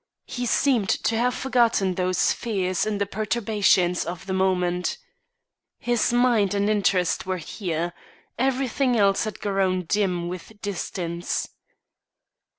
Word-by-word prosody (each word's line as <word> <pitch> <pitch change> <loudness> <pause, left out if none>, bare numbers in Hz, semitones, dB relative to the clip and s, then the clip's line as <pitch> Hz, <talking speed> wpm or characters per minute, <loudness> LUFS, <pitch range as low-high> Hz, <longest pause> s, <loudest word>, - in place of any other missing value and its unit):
He 245 0 -4
seemed 235 -6 +2
to 225 - +1
have 245 +2 +1
forgotten 235 -8 +2
those 185 0 +1
fears 190 -4 -1
in 210 -1 -1
the 200 - 0
perturbations 205 -4 +1
of 170 +1 -6
the 190 - -3
moment. 180 -1 0 0.8
His 240 -1 +1
mind 240 -5 +3
and 200 0 +1
interest 190 -4 +1
were 185 -1 -1
here; 170 -1 -3 0.4
everything 260 -1 +1
else 200 -1 +3
had 215 - -5
grown 190 -2 0
dim 180 -1 0
with 185 +4 -8
distance. 175 -4 -3
200 Hz, 125 wpm, -24 LUFS, 180-230 Hz, 0.8 s, mind